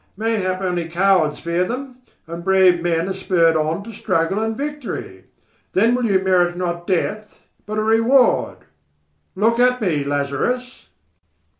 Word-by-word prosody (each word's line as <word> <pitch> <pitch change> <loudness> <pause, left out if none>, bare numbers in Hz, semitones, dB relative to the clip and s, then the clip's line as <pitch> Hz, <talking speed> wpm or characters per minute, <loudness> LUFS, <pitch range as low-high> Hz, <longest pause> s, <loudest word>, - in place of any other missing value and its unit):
Mayhap 200 -4 -1
only 175 -3 -2
cowards 175 -3 +2
fear 170 +2 -1
them, 255 +5 -5 0.3
and 170 +1 -8
brave 190 -2 +4
men 170 0 0
are 190 - -2
spurred 175 -4 +2
on 155 +4 -1
to 225 +2 -10
struggle 165 0 -1
and 220 0 -2
victory. 275 - -6 0.5
Then 225 +5 +3
will 250 -1 0
you 200 -4 +3
merit 180 -2 +1
not 175 -1 -3
death 210 +3 -2 0.3
but 215 0 -4
a 215 - 0
reward. 230 +4 +3 0.8
Look 225 +4 +1
at 250 0 +3
me, 165 - 0
Lazarus." 145 - -3
190 Hz, 145 wpm, -20 LUFS, 170-225 Hz, 0.8 s, brave